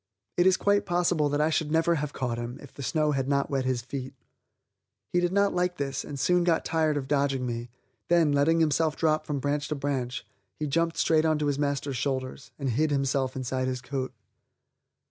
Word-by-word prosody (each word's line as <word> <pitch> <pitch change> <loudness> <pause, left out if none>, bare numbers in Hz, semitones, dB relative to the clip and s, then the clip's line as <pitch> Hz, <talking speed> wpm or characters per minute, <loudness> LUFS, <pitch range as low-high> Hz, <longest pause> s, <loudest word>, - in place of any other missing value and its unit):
It 175 +1 +4
is 185 0 +5
quite 205 0 +2
possible 175 -4 +2
that 145 +1 +1
I 155 +1 +2
should 155 -1 0
never 165 +1 +3
have 150 -3 -2
caught 125 -4 -3
him 120 +1 -5
if - - -13
the - - -9
snow 150 +4 +1
had 135 -2 -1
not 140 0 +1
wet 135 -2 0
his 130 -2 0
feet. 130 +1 -6 1.0
He 175 - +4
did 175 0 +1
not 200 +1 +2
like 180 0 0
this 140 -1 -2
and 140 -2 -7
soon 180 +5 +3
got 170 -2 +1
tired 155 -2 +1
of 135 -2 -3
dodging 140 -2 +1
me; 120 0 -4 0.4
then, 170 -3 +4
letting 155 +4 +3
himself 155 0 +2
drop 155 -1 +1
from 145 - -1
branch 145 +2 -1
to 150 - -2
branch, 135 -3 -3 0.3
he 155 - -2
jumped 165 +3 0
straight 160 -1 +3
onto 155 -2 +1
his 145 -1 0
master's 140 -2 -1
shoulders 130 +1 -3
and 135 -3 -1
hid 155 +7 +1
himself 135 -2 0
inside 130 0 -2
his 130 -1 -2
coat. 130 0 -4
145 Hz, 205 wpm, -27 LUFS, 135-160 Hz, 1.0 s, is